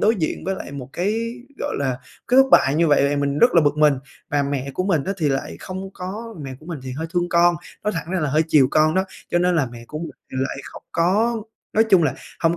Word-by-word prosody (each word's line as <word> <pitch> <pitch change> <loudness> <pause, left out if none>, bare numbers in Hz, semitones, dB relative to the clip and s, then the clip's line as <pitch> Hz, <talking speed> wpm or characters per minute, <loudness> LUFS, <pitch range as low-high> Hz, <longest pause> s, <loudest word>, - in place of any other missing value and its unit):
đối 220 +2 +4
diện 160 -5 -2
với 190 +1 -1
lại 165 - -8
một 135 -3 -7
cái, 225 +6 -1 0.2
gọi - - -3
là, 130 -3 -1 0.3
cái 250 - +3
thất 270 - -3
bại 135 - +6
như 165 +2 +3
vậy 145 -1 +4
thì 145 - 0
mình 140 0 0
rất 240 +3 +5
là 170 - +7
bực 145 +1 +2
mình 150 -1 +5 0.4
và 145 -1 +2
mẹ 140 -1 -2
của 185 - -1
mình 165 -8 +1
á 195 - -1
thì 155 -3 +1
lại 135 - -2
không 190 +1 -6
có 215 +5 -6
mẹ 135 -1 -6
của 155 - -15
mình 170 -4 -5
thì 130 -1 -6
hơi 160 +5 -4
thương 175 0 +1
con, 175 0 +4 0.3
nói 210 - +1
thẳng 170 - -4
ra 190 -2 0
là 150 - 0
hơi 155 +3 +3
chiều 140 -5 +5
con 155 +1 +3
đó, 190 0 +2 0.3
cho 175 - +3
nên 180 0 +2
là 145 - +2
mẹ 120 -1 -10
của 150 - -6
mình 165 - -5 0.2
thì - - -6
lại 135 - -2
không - - -10
có 215 +7 +2 0.3
nói 220 +1 +5
chung 185 -3 +6
là 145 -5 +1 0.3
hông 170 0 +2
165 Hz, 270 wpm, -22 LUFS, 140-190 Hz, 0.4 s, là